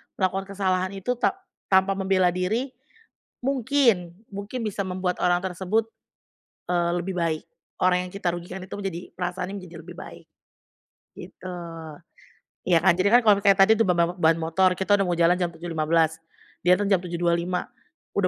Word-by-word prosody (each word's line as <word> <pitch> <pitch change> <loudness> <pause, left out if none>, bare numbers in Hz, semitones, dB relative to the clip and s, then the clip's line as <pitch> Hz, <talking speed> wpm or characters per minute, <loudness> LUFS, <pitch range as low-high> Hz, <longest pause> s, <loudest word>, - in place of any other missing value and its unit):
melakukan 190 +1 -1
kesalahan 185 -1 0
itu 195 +6 -2
ta - - +1 0.3
tanpa 190 0 +4
membela 190 -2 +2
diri, 220 +9 -1 0.7
mungkin, 245 -9 +1 0.2
mungkin 205 +5 -5
bisa 205 -2 -2
membuat 180 -1 -2
orang 175 0 +3
tersebut, 190 +4 -1 0.8
eee, 175 -1 +1
lebih 180 +1 -3
baik. 160 -2 -1 0.4
Orang 180 0 +2
yang - - -12
kita 180 -3 -1
rugikan 180 +2 -7
itu 185 - -8
menjadi 190 -4 -4 0.2
perasaannya 180 +2 -4
menjadi 180 -2 -12
lebih 175 0 -11
baik, - - -11 1.0
gitu. 185 0 -9 1.1
Iya 175 -2 +5
kan, - - +6
jadi 190 - +3
kan 245 - +8
kalau 210 -2 +6
misalnya 200 -1 +4
tadi 220 - +6
itu 225 - +4
ba 180 - +3
ba 170 0 +2
ba 180 - -14
ban 160 0 +4
motor, 180 +3 +2
kita 195 +2 +2
udah 195 - +2
mau 175 - 0
jalan 170 +1 +4
jam 175 - +1
07.15, 165 -1 0 0.4
dia 180 +1 +6
datang 205 +1 -1
jam 190 - +5
07.25, 175 +1 0 0.5
udah 200 -2 +2
185 Hz, 165 wpm, -25 LUFS, 175-195 Hz, 1.1 s, kan